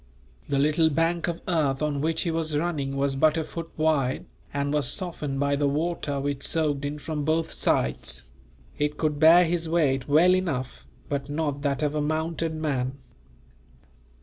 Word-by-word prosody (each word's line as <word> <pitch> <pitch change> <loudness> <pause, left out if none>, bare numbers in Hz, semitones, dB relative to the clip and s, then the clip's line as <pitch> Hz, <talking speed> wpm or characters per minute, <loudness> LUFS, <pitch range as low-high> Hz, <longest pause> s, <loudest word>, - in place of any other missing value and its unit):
The 140 - +1
little 155 +3 +3
bank 165 +2 0
of 170 -1 -4
earth 150 -5 +1
on 145 -2 -1
which 160 +1 0
he 170 - -1
was 160 -2 -1
running 145 -4 -2
was 140 0 0
but 155 +3 +3
a 160 - 0
foot 165 +1 -7
wide, 150 -5 +1 0.3
and 140 0 -1
was 145 -5 +1
softened 150 -7 -3
by 140 0 +2
the 145 0 +1
water 150 -1 -1
which 140 0 -2
soaked 150 -4 0
in 145 +1 -3
from 150 0 -4
both 160 +2 0
sides. 65 +1 0 0.6
It 150 0 0
could 150 -2 -1
bear 165 +3 +7
his 165 -1 -1
weight, 140 -6 +1
well 165 +5 +5
enough; 140 -9 -3 0.2
but 140 0 -3
not 145 -1 -2
that 145 0 -1
of 150 -1 0
a 150 - 0
mounted 160 +1 -1
man. 135 -5 -1
150 Hz, 175 wpm, -26 LUFS, 140-165 Hz, 0.6 s, bear